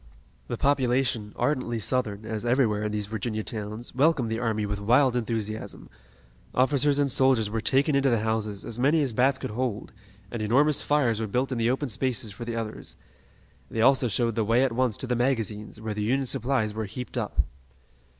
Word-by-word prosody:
The - - -3
population, 125 -5 +1
ardently 130 -5 0
Southern, 110 -2 -2
as 110 -1 -4
everywhere 120 -4 +2
in 105 - -1
these 105 -1 -2
Virginia 110 +1 -3
towns, 110 +2 -6
welcomed 135 -3 +2
the 115 0 -2
army 110 -3 -1
with 100 0 -3
wild 125 +5 +3
enthusiasm. 110 -2 -4 0.6
Officers 140 +2 +3
and 140 -2 +2
soldiers 125 -5 +3
were 110 0 -1
taken 140 +5 +2
into 140 0 +3
the 115 -3 +2
houses, 110 -2 -2
as 115 +1 -5
many 145 +4 +3
as 130 -4 -2
Bath 130 +3 +2
could - - -5
hold, 120 -2 -3 0.4
and 115 - -4
enormous 140 +7 +3
fires 125 -7 +1
were 110 - -2
built 125 +6 -1
in 125 - -2
the 115 +1 +2
open 135 +3 0
spaces 120 -2 -2
for 110 +4 -8
the 115 -1 -4
others. 110 -2 -6 0.7
They 115 - -2
also 130 +1 +5
showed 115 +1 +1
the 110 0 0
way 115 +4 +3
at 135 - +1
once 125 -3 +1
to - - -4
the 125 -1 0
magazines, 115 -4 -1
where 110 -1 -4
the 105 - -4
Union 130 +6 +1
supplies 120 -3 0
were 110 0 -3
heaped 125 +5 -7
up. - - 0
120 Hz, 195 wpm, -26 LUFS, 110-130 Hz, 0.7 s, also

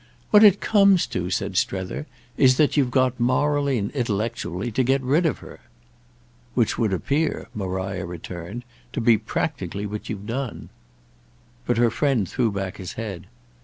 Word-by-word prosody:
"What 210 0 +8
it 200 -2 +7
comes 200 -4 +4
to," 90 0 -2
said 95 +1 -2
Strether, 95 +12 -2 0.3
"is 130 -1 +5
that 150 - +3
you've 140 -4 +3
got 130 0 +1
morally 140 +2 +2
and 100 -1 -2
intellectually 115 - -2
to 130 +4 +1
get 135 +2 +2
rid 150 +7 +2
of 150 - -1
her." - - -12 1.0
"Which 120 -3 +2
would 110 -3 0
appear," 140 - -1
Maria 95 -1 -3
returned, 90 +5 -7 0.3
"to - - -2
be 115 -2 +4
practically 100 +1 -3
what 105 +1 -6
you've 105 -3 -5
done." 120 +2 -4 1.0
But 120 - +1
her 120 -1 +3
friend 125 -5 +1
threw 120 0 0
back 95 -2 -4
his 95 -2 -7
head. 100 -6 -6
115 Hz, 160 wpm, -23 LUFS, 95-135 Hz, 1.0 s, What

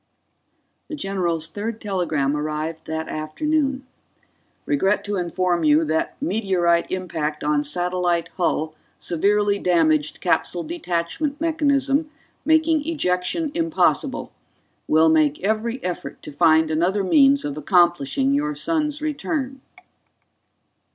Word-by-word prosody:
The 310 - -5
general's 175 - -2
third 220 +4 -5
telegram 170 -9 -1
arrived 155 +2 -4
that 160 0 -3
afternoon: 270 - -1 0.8
_Regret 210 -9 +1
to 205 0 -3
inform 175 -1 0
you 155 +1 +4
that 160 +1 -2
meteorite 185 - +1
impact 160 -5 -3
on 150 0 +1
satellite 175 +2 0
hull 160 -2 -1 0.2
severely 205 +4 +1
damaged 155 -5 +2
capsule 175 -1 0
detachment 285 - -3
mechanism, 295 -2 +1 0.4
making 315 -1 +2
ejection 285 - -1
impossible. 330 0 0 0.6
Will 160 +1 +4
make 155 -2 +3
every 220 +4 0
effort 175 -6 -5
to - - -8
find 160 +1 +3
another 180 +6 +1
means 275 +7 +4
of 145 -1 -3
accomplishing 175 - +2
your 295 +1 0
son's 300 -2 -1
return. 275 -3 -3
185 Hz, 110 wpm, -22 LUFS, -, 0.8 s, you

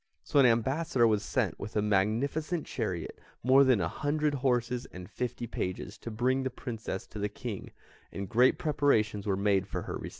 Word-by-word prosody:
So 145 - +2
an 135 - +7
ambassador 130 +3 +2
was 105 -3 +3
sent - - -1
with 105 - -7
a 105 - +3
magnificent 125 - 0
chariot, - - -4 0.2
more 130 +3 +6
than 130 -5 +4
a 85 - 0
hundred 150 - 0
horses, 125 -2 0
and 90 0 -9
fifty 125 +2 -4
pages, 95 -2 -4
to - - -6
bring 125 +4 +1
the 130 - -1
Princess 115 -6 -5
to 105 - -9
the 105 0 -1
King, 105 -1 -6 0.4
and 100 0 -5
great 125 +7 +4
preparations 110 -9 +1
were 95 -2 +1
made 100 -1 +2
for - - -4
her - - -5
reception. - - -5
120 Hz, 190 wpm, -30 LUFS, 105-135 Hz, 0.4 s, an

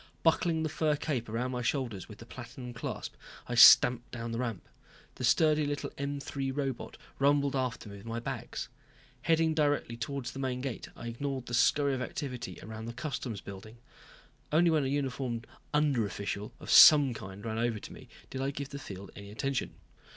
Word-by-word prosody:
Buckling 165 0 +2
the - - +1
fur 155 0 +1
cape 135 -6 -3
around 120 +3 -2
my 125 -1 -2
shoulders 120 -6 -2
with 105 - -10
the 115 - -11
platinum 125 +1 -9
clasp, 115 - -5 0.3
I 120 - -3
stamped 120 0 +8
down 115 -1 -5
the 115 - -3
ramp. 115 -7 -3 0.5
The - - -7
sturdy 155 -1 +4
little 145 0 -3
M 140 0 -3
3 135 -1 -3
robot 135 -2 -3 0.2
rumbled 140 0 +3
after 130 -5 -2
me 100 -1 -9
with 100 - -12
my 115 +1 -3
bags. 115 - -5 0.5
Heading 160 -1 +3
directly 145 -6 +1
towards 120 +2 -4
the 135 - -8
main 130 -2 -2
gate, 130 -3 -5
I - - -9
ignored 130 +2 -4
the 120 - -7
scurry 140 +4 +3
of 130 - -2
activity 125 -1 -5
around 110 0 -7
the 115 - -5
customs 120 -6 -4
building. 105 +4 -10 0.7
Only 165 +2 +4
when 155 -3 +3
a - - 0
uniformed 130 -4 -2 0.3
under 145 -5 +2
official 100 +2 -4
of - - -5
some 145 -4 +9
kind 95 -1 -9
ran 110 0 -2
over 120 -1 0
to - - -9
me, - - -13 0.2
did 130 - -4
I 135 - 0
give 140 -1 -5
the 140 - -7
field 100 -8 -9
any 100 0 -9
attention. 130 +5 -2
130 Hz, 190 wpm, -31 LUFS, 115-140 Hz, 0.7 s, some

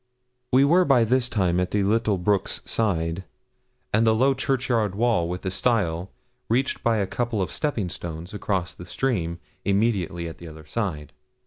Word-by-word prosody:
We 130 +2 +6
were 175 +6 +5
by 135 -7 +4
this 125 +2 +1
time 90 -6 +1
at 90 - 0
the 105 -1 +1
little 105 0 +2
brook's 100 +2 0
side, 85 -5 0 0.7
and 110 +2 +4
the 110 - +5
low 135 +4 +4
churchyard 125 -7 0
wall 110 -7 +2
with 90 +2 -5
a 95 - 0
stile, 95 -6 +1 0.4
reached 130 +4 +1
by 115 -1 +2
a 100 - +1
couple 120 +2 -2
of 90 -4 -1
stepping 130 - -1
stones, 85 +3 -7
across 95 -3 -2
the 90 - -11
stream, 85 -7 -1 0.3
immediately 100 -5 0
at 80 - -9
the 85 - -9
other 80 -1 -11
side. 75 -5 -3
105 Hz, 175 wpm, -25 LUFS, 90-120 Hz, 0.7 s, We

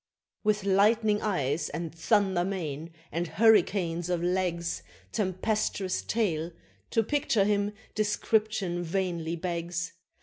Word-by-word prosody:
With 210 -2 +2
lightning 210 +2 +3
eyes, 155 -7 0
and 165 +1 -4
thunder 190 +1 +2
mane, 165 -4 -4 0.2
and 170 +3 -1
hurricanes 180 -5 +3
of 175 -1 0
legs, 175 - 0 0.3
Tempestuous 195 -1 0
tail 170 -8 0 0.4
to 225 - +2
picture 235 -5 +2
him 205 0 +1 0.2
description 210 -3 0
vainly 170 -2 -1
begs! 170 0 -3
185 Hz, 105 wpm, -29 LUFS, 170-210 Hz, 0.4 s, lightning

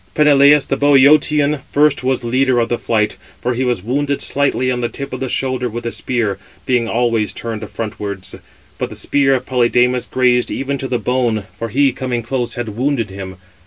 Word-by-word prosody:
Peneleus, 145 -1 +5
the 135 - -2
Bœotian, 145 +1 +4
first 145 -2 +2
was 130 -1 0
leader 130 +2 +1
of 115 - 0
the 120 - -1
flight; 110 -2 0 0.2
for 125 - -1
he 125 +2 -1
was 120 -7 -1
wounded 140 +4 -1
slightly 140 -2 0
565 - - +1
on 125 - -3
the 120 - -1
tip 140 +4 -7
of - - -4
the 130 - -3
shoulder 130 -1 -1
with 120 +1 -6
a 115 - -2
spear, 110 -7 -2 0.3
being 125 -2 +1
always 115 -3 +1
turned 115 -2 -5
frontwards; 100 -3 -6 0.5
but - - -2
the - - -9
spear 135 -1 +2
of 130 0 -3
Polydamas 125 0 +2
grazed 125 -1 +2
even 140 0 -3
to 135 - -3
the 125 - 0
bone, 120 -4 0
for 115 - -5
he, 140 +4 +3
coming 125 -2 -3
close, 120 0 -3
had 120 -2 -4
wounded 125 -4 -1
him. 95 -1 -7
125 Hz, 200 wpm, -17 LUFS, 115-135 Hz, 0.5 s, Peneleus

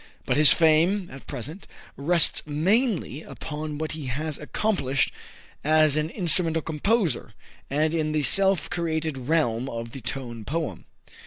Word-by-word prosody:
But - - 0
his 150 0 +7
fame, 170 +4 +3
at 135 0 -12
present, 155 - -7 0.3
rests 165 +2 +3
mainly 180 - 0
upon 150 -2 -6
what 155 0 -3
he 155 -4 -5
has 150 +4 -3
accomplished 150 -5 0 0.5
as 155 -1 +4
an 155 +1 0
instrumental 165 -3 0
composer, 180 +4 -1 0.4
and 155 +3 +1
in 155 -2 0
the 155 -1 0
self 195 +1 +5
created 160 -3 -2
realm 135 -6 +1
of 115 -1 -6
the 135 - -9
Tone 120 -1 -5
Poem. 145 - -4
155 Hz, 140 wpm, -25 LUFS, 140-165 Hz, 0.5 s, his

